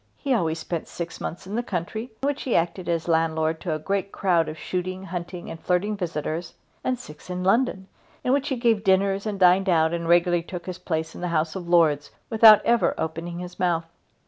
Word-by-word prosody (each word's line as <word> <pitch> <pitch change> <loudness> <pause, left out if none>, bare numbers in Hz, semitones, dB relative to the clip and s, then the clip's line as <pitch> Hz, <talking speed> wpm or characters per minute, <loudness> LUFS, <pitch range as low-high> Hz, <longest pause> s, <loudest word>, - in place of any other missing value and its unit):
He 275 -2 0
always 165 -8 +1
spent 160 0 -4
six 170 0 -6
months 175 - -5
in 195 - -7
the 235 - 0
country, 215 +1 -4 0.2
in - - +2
which 285 0 -1
he 255 - -1
acted 175 +2 0
as 165 -1 -1
landlord 160 -1 +1
to 165 -4 -1
a - - -1
great 195 +5 -2
crowd 175 -5 +1
of 155 - -7
shooting, 185 +3 -4
hunting, 175 -1 -6
and 165 - -7
flirting 185 +5 0
visitors, 165 -2 -4 0.3
and 255 -1 0
six 150 -9 -12
in 180 0 -3
London, 195 -1 +1 0.4
in 250 - +2
which 280 +1 +1
he 265 - 0
gave 230 -4 +2
dinners 195 +1 +2
and 205 -2 -3
dined 185 +1 +5
out 160 -1 +3
and 170 -1 -2
regularly 175 0 +4
took 175 +1 -8
his 185 -1 -6
place 160 -2 -3
in - - -9
the 180 - -1
House 160 -1 0
of 175 -2 -6
Lords 155 -4 +3 0.2
without 220 -1 +8
ever 235 0 +3
opening 170 +2 -4
his 180 0 -8
mouth. 170 -2 +1
180 Hz, 215 wpm, -25 LUFS, 165-200 Hz, 0.4 s, without